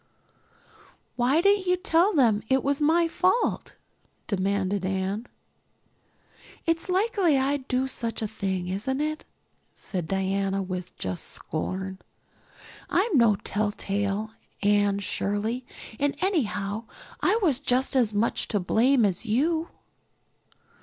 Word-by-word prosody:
"Why 255 +6 +3
didn't 400 0 +3
you 360 0 +3
tell 350 +2 +3
them 235 - +3
it 265 0 +3
was 280 +1 0
my 330 +3 +4
fault?" 370 +7 0 0.5
demanded 200 -1 0
Anne. 195 +4 -2 1.4
"It's 330 +2 0
likely 375 - +2
I'd 270 0 0
do 255 +1 0
such 230 -3 -3
a - - 0
thing, 190 -4 -3
isn't 210 +9 -2
it?" 310 +1 -2 0.5
said 180 -5 -3
Diana 195 +1 0
with 185 -1 -6
just 90 -1 -4
scorn. 190 0 -4 0.9
"I'm 390 0 +2
no 230 -5 +5
telltale, 205 +1 -2 0.3
Anne 205 -1 +3
Shirley, 210 +5 -2 0.3
and 285 0 +1
anyhow 225 - -1 0.4
I 440 - +3
was 290 -8 +3
just 260 -1 +1
as 240 -5 +3
much 210 +2 0
to 210 - 0
blame 235 +6 +3
as 200 +4 -2
you." 315 +9 +1
230 Hz, 120 wpm, -26 LUFS, 200-295 Hz, 1.4 s, no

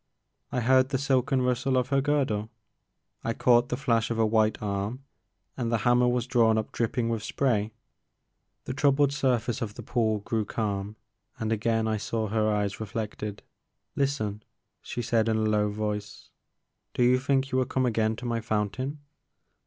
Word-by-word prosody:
I 125 - 0
heard 130 +2 +4
the 135 - 0
silken 135 -1 +1
rustle 125 +1 +1
of 125 0 0
her 135 -1 +2
girdle, 130 -7 0 0.7
I 115 - -1
caught 120 0 +4
the 125 - -1
flash 115 -4 +1
of 115 - -2
a 115 - +3
white 110 0 +2
arm, 105 +5 -3 0.5
and 120 -3 -2
the 115 - +3
hammer 120 0 +4
was 125 -1 +1
drawn 115 -3 +3
up 110 - -2
drip 115 -2 -1
ping 115 -2 0
with 115 -2 -1
spray. 110 -2 0 0.9
The 130 - -3
troubled 140 0 +3
surface 125 -4 0
of 110 -2 -4
the - - -8
pool 110 -3 +1
grew 110 +1 -1
calm 105 -1 -3 0.4
and 110 0 -2
again 115 0 +1
I 110 -1 0
saw 110 0 -2
her 110 0 +1
eyes 105 -1 -1
reflected. 105 -1 -5 0.5
Listen, 110 -7 -1 0.4
she 120 - -5
said 115 0 +2
in 110 - +2
a - - 0
low 105 -1 +2
voice, 105 -1 -4 0.6
do 125 - +2
you 125 +1 +4
think 135 0 0
you 130 - +2
will 130 - +2
come 130 +1 0
again 110 -2 +1
to 125 - -8
my 115 -1 -1
fountain 115 +7 -2
115 Hz, 175 wpm, -27 LUFS, 110-130 Hz, 0.9 s, heard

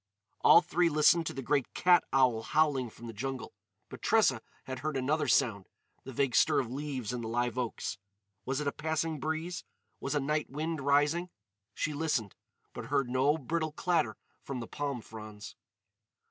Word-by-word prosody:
All 170 - +8
three 175 0 +2
listened 155 +2 +4
to - - -3
the 135 - -4
great 135 +1 0
cat 180 -1 +5
owl 125 -4 +3
howling 145 -1 +1
from 115 - -13
the 115 - -7
jungle. 130 +3 -5 0.3
But - - -10
Tressa - - +3 0.2
had 130 -1 -6
heard 150 0 -2
another 145 +3 0
sound—the 120 +1 -1
vague 135 0 0
stir - - +4
of 120 -3 -3
leaves 130 -4 -4
in 125 - -3
the 115 - -4
live 120 +1 -1
oaks. 120 -4 -3 0.4
Was 135 +1 -2
it 150 - -3
a - - +2
passing 160 0 -2
breeze? 160 +4 -3 0.4
Was 140 - -2
a - - +3
night 150 +2 -1
wind 155 +2 -3
rising? 145 +6 +2 0.5
She 155 - -1
listened. 145 -9 -1 0.4
But - - -6
heard 135 -3 0
no 135 +4 +3
brittle 155 +2 -2
clatter 165 - 0 0.2
from 135 -2 -5
the 115 - -5
palm 140 -1 -4
fronds. 105 -2 -10
140 Hz, 175 wpm, -31 LUFS, 125-155 Hz, 0.5 s, All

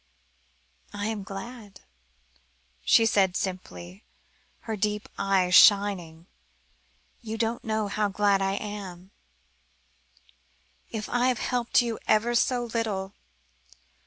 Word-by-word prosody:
"I 205 0 -4
am 220 -1 -2
glad," 200 +1 -9 1.0
she 225 - +5
said 195 -4 +2
simply, 95 - -5 0.6
her 220 - -4
deep 210 +1 -2
eyes 190 -2 +1
shining. 190 -6 +5 1.0
"You 225 -1 -5
don't 230 +1 -2
know 220 -1 -1
how 210 +1 0
glad 200 0 +2
I 195 0 0
am, 195 -3 -7 1.8
if 215 -2 -5
I 245 +1 +1
have 255 -2 +1
helped 245 +1 +1
you 230 -2 -3
ever 225 +3 +3
so 245 +1 +1
little. 215 -5 -3
205 Hz, 105 wpm, -26 LUFS, 190-225 Hz, 1.8 s, she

